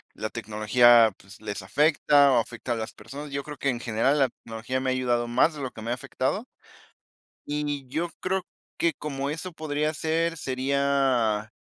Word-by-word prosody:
la 110 Hz, +1 st, -4 dB
tecnología, 115 Hz, +1 st, +5 dB
pues, 100 Hz, +3 st, -15 dB
les 105 Hz, -2 st, -5 dB
afecta 145 Hz, -, +4 dB
o 125 Hz, -, +4 dB
afecta 120 Hz, +1 st, -5 dB
a -, -, +2 dB
las 110 Hz, -1 st, -5 dB
personas. 140 Hz, +7 st, -9 dB
Yo 140 Hz, 0 st, -3 dB
creo 150 Hz, 0 st, -8 dB
que 140 Hz, -, 0 dB
en 120 Hz, -2 st, -1 dB
general, 120 Hz, +5 st, +1 dB
la 135 Hz, -3 st, +3 dB
tecnología 115 Hz, +3 st, -5 dB
me 130 Hz, 0 st, -1 dB
ha -, -, +2 dB
ayudado 120 Hz, -2 st, 0 dB
más 120 Hz, +7 st, +3 dB
de 150 Hz, -, -8 dB
lo 130 Hz, -, -3 dB
que 110 Hz, -, -11 dB
me 115 Hz, -, -3 dB
ha -, -, +2 dB
afectado. 130 Hz, -, -2 dB, 1.0 s
Y 145 Hz, -2 st, -3 dB
yo 165 Hz, +6 st, -2 dB
creo 190 Hz, 0 st, -1 dB, 0.4 s
que 170 Hz, -1 st, +2 dB
como 140 Hz, -2 st, -3 dB
eso 165 Hz, +4 st, -5 dB
podría 155 Hz, 0 st, -1 dB
ser, 165 Hz, +2 st, 0 dB
sería 130 Hz, -5 st, +1 dB
130 Hz, 185 wpm, -26 LUFS, 115-150 Hz, 1.0 s, tecnología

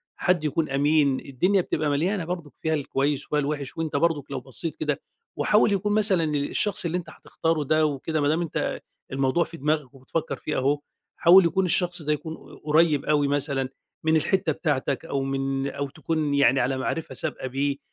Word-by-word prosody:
حد 180 Hz, -4 st, +1 dB
يكون 155 Hz, +1 st, 0 dB
أمين، 140 Hz, -1 st, +2 dB
الدنيا 180 Hz, +9 st, +1 dB
بتبقى 155 Hz, -3 st, -1 dB
مليانة 170 Hz, +6 st, 0 dB
برضُك 170 Hz, -4 st, -5 dB
فيها 160 Hz, 0 st, 0 dB
الكويس 140 Hz, -1 st, 0 dB
وفيها 150 Hz, -, 0 dB
الوِحِش 145 Hz, -1 st, -3 dB
وأنت 160 Hz, -3 st, -3 dB
برضُك 145 Hz, -3 st, 0 dB
لو 135 Hz, -, -2 dB
بصّيت 130 Hz, +5 st, -4 dB
كده 150 Hz, -1 st, -2 dB, 0.4 s
وحاول 210 Hz, 0 st, +3 dB
يكون 205 Hz, +2 st, 0 dB
مثلًا 200 Hz, -6 st, +4 dB
الشخص 175 Hz, +7 st, 0 dB
اللي 170 Hz, +2 st, 0 dB
أنت 180 Hz, -, -7 dB
هتختاره 165 Hz, -2 st, -2 dB
ده 155 Hz, +2 st, +2 dB
وكده 150 Hz, +2 st, -1 dB
ما 145 Hz, -, +2 dB
دام 160 Hz, +3 st, +2 dB
أنت 170 Hz, -, -2 dB, 0.3 s
الموضوع 135 Hz, +5 st, +2 dB
في 165 Hz, -, -10 dB
دماغك 150 Hz, -2 st, -1 dB
وبتفكّر 135 Hz, +4 st, -3 dB
فيه 150 Hz, -, -3 dB
أهو، 140 Hz, +3 st, +1 dB, 0.4 s
حاول 175 Hz, +2 st, +7 dB
يكون 190 Hz, +3 st, +1 dB
الشخص 175 Hz, 0 st, +2 dB
ده 150 Hz, 0 st, +1 dB
يكون 160 Hz, +2 st, -5 dB
ق -, -, -15 dB
قريّب 155 Hz, -1 st, +3 dB
أوي 145 Hz, -2 st, +2 dB
مثلًا 140 Hz, -2 st, -1 dB, 0.4 s
من 160 Hz, -, +4 dB
الحتّة 160 Hz, +1 st, +1 dB
بتاعتك 150 Hz, -1 st, -1 dB
أو 140 Hz, -4 st, -2 dB
من 135 Hz, 0 st, -1 dB
أو 140 Hz, 0 st, -4 dB
تكون 155 Hz, 0 st, -2 dB
يعني 140 Hz, -1 st, +4 dB
على 130 Hz, +1 st, 0 dB
معرِفة 135 Hz, +1 st, -3 dB
سابقة 130 Hz, -, -4 dB
بيه 140 Hz, +2 st, -1 dB
150 Hz, 185 wpm, -25 LUFS, 140-165 Hz, 0.4 s, حاول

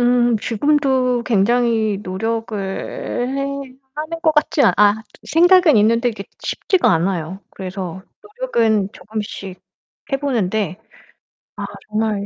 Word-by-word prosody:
음 240 Hz, -1 st, +3 dB
지금도 255 Hz, +1 st, +1 dB
굉장히 225 Hz, -1 st, +2 dB
노력을 225 Hz, +3 st, -3 dB
해 245 Hz, +7 st, -3 dB, 0.5 s
하는 310 Hz, +2 st, -5 dB
것 315 Hz, -, +4 dB
같지 300 Hz, 0 st, +2 dB, 0.2 s
아 210 Hz, 0 st, +5 dB, 0.3 s
생각은 350 Hz, -2 st, +5 dB
있는데 230 Hz, +3 st, +3 dB
그게 200 Hz, -3 st, -8 dB, 0.2 s
쉽지가 375 Hz, -3 st, +1 dB
않아요. 175 Hz, +1 st, -1 dB
그래서 185 Hz, -1 st, -6 dB, 0.4 s
노력은 220 Hz, -, +1 dB
조금씩 205 Hz, -3 st, -7 dB, 0.5 s
해보는데 220 Hz, -9 st, -1 dB, 0.8 s
아 -, -, -5 dB, 0.2 s
정말 215 Hz, -1 st, -1 dB
225 Hz, 230 characters per minute, -19 LUFS, 200-265 Hz, 0.8 s, 아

